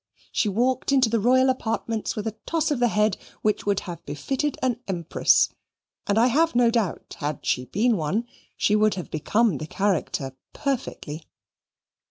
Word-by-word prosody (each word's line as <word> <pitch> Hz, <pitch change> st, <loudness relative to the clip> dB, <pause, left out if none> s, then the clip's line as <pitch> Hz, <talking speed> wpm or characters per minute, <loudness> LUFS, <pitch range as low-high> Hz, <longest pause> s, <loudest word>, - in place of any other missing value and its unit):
She 215 Hz, -, +1 dB
walked 250 Hz, +6 st, +1 dB
into 260 Hz, -4 st, +4 dB
the 230 Hz, -, +2 dB
royal 255 Hz, +4 st, +4 dB
apartments 225 Hz, -3 st, -1 dB
with 210 Hz, -, -4 dB
a 220 Hz, -1 st, -3 dB
toss 325 Hz, -2 st, 0 dB
of 285 Hz, -, 0 dB
the 240 Hz, -, +4 dB
head 210 Hz, -2 st, +2 dB, 0.3 s
which 210 Hz, -1 st, 0 dB
would 200 Hz, -1 st, +2 dB
have 170 Hz, -3 st, -8 dB
befitted 265 Hz, -, -2 dB
an 245 Hz, -3 st, +1 dB
empress, 170 Hz, -4 st, +3 dB, 0.6 s
and 200 Hz, -, +2 dB
I 230 Hz, -, +5 dB
have 305 Hz, +4 st, +2 dB
no 240 Hz, -1 st, +5 dB
doubt 225 Hz, -6 st, -2 dB
had 145 Hz, -2 st, -3 dB
she 125 Hz, -, 0 dB
been 225 Hz, -, +1 dB
one, 180 Hz, +9 st, -1 dB, 0.3 s
she 210 Hz, -, +2 dB
would 215 Hz, -1 st, +3 dB
have 180 Hz, -, -7 dB
become 205 Hz, -, +1 dB
the 155 Hz, -, -5 dB
character 160 Hz, -9 st, -1 dB, 0.2 s
perfectly. 230 Hz, -, -4 dB
215 Hz, 170 wpm, -25 LUFS, 185-245 Hz, 0.6 s, I